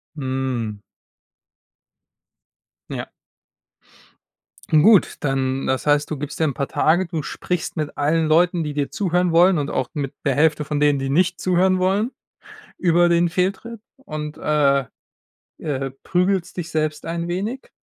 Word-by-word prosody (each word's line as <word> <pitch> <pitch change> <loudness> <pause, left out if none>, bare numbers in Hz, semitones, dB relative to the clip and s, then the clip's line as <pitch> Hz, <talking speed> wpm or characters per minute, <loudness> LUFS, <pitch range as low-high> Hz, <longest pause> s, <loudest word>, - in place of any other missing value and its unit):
Mhm. 130 -6 -3 2.1
Ja. - - -5 1.6
Gut, 175 +6 +5
dann 135 -2 -1
das 130 +2 -1
heißt, 145 +1 +2
du 155 - -2
gibst 150 +3 -5
dir - - +4
'n 150 -3 +1
paar 140 +2 -3
Tage, 175 +4 +2
du 165 -3 -4
sprichst 175 +3 -4
mit 150 -1 -3
allen 155 +2 +1
Leuten, 170 +1 +3
die 150 - -4
dir 145 -1 -2
zuhören 180 -2 0
wollen 175 +2 +5
und 145 0 -2
auch 130 - -1
mit 140 -3 -4
der 140 -3 +2
Hälfte 150 0 +2
von 150 0 -2
denen, 145 -1 +3
die 135 0 -3
nicht 175 +4 +1
zuhören 185 +1 +2
wollen 195 +6 +1 0.7
über 175 -1 +3
den 170 0 +2
Fehltritt 195 +6 -2 0.2
und, 150 - -7
äh, 140 -3 +2 0.8
äh, 135 -3 -3
prügelst 185 0 0
dich 165 -3 -5
selbst 155 -1 -2
ein 170 +1 -3
wenig? 210 +9 -4
155 Hz, 145 wpm, -21 LUFS, 145-180 Hz, 2.1 s, Gut